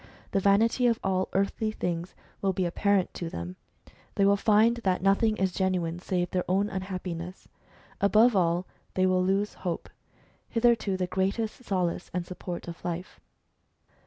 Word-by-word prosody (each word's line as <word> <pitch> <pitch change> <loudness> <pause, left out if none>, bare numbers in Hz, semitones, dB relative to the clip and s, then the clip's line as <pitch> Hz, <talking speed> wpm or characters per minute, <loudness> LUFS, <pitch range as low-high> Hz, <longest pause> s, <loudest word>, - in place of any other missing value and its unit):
The 195 - +2
vanity 220 +5 +3
of 230 -1 +2
all 190 -1 0
earthly 200 +3 0
things 175 -4 -3 0.3
will 195 -1 +1
be 185 0 0
apparent 195 +2 +1
to 170 - -4
them; 85 - -6 0.6
they 200 - +3
will 200 0 +5
find 220 +3 +4
that 190 -6 0
nothing 215 +3 +3
is 190 -1 +1
genuine 180 -3 -1
save 180 -1 -1
their 180 - 0
own 195 +3 +1
unhappiness. 185 -2 -5 0.5
Above 215 +4 +5
all, 175 -1 +2 0.3
they 185 - +3
will 185 -1 +3
lose 195 +2 +1
hope, 175 -3 -3 0.6
hitherto 230 -5 +2
the 185 - 0
greatest 195 +6 -2
solace 180 -6 -1
and 180 -1 -1
support 180 -1 -6
of 170 -1 -8
life. 175 +1 -5
190 Hz, 155 wpm, -28 LUFS, 180-205 Hz, 0.6 s, will